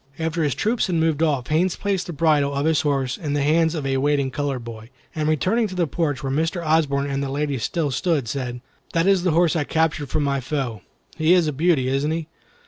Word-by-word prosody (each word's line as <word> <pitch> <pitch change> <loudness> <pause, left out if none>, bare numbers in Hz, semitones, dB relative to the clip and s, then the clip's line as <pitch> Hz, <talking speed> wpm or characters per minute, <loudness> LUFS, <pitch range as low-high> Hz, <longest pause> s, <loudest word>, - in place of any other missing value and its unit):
After 165 +1 -2
his 145 -4 0
troop 220 - 0
had 180 - +1
moved 160 -2 +1
off, 145 -6 +1
Haines 170 +4 +2
placed 200 -3 -2
the - - -4
bridle 150 -3 +2
of 140 +1 0
his 160 -1 +3
horse 135 -3 -1
in 150 -3 -3
the 145 -1 +1
hands 160 +2 +2
of 150 -3 -3
a 135 0 0
waiting 140 -1 +1
colored 140 -3 -3
boy, 115 -1 -9 0.2
and 155 -1 -1
returning 195 - +1
to 185 - -8
the 175 -2 +1
porch 150 -1 -2
where 135 - -2
Mr. 165 +3 -1
Osborne 150 -3 +2
and 140 0 -2
the 140 - -2
ladies 140 -2 -2
still 155 +1 -1
stood, 145 -2 0
said: 125 0 -4 0.3
"That 165 0 +2
is 195 -2 +4
the 180 - +1
horse 170 +1 +3
I 155 - +1
captured 155 -2 0
from 155 +1 0
my 140 -1 0
foe. 130 -6 -3 0.4
He 160 +3 +4
is 175 -2 +3
a 150 - -1
beauty, 150 -3 +2
isn't 135 +3 0
he? 160 -1 -3
150 Hz, 235 wpm, -22 LUFS, 140-165 Hz, 0.4 s, is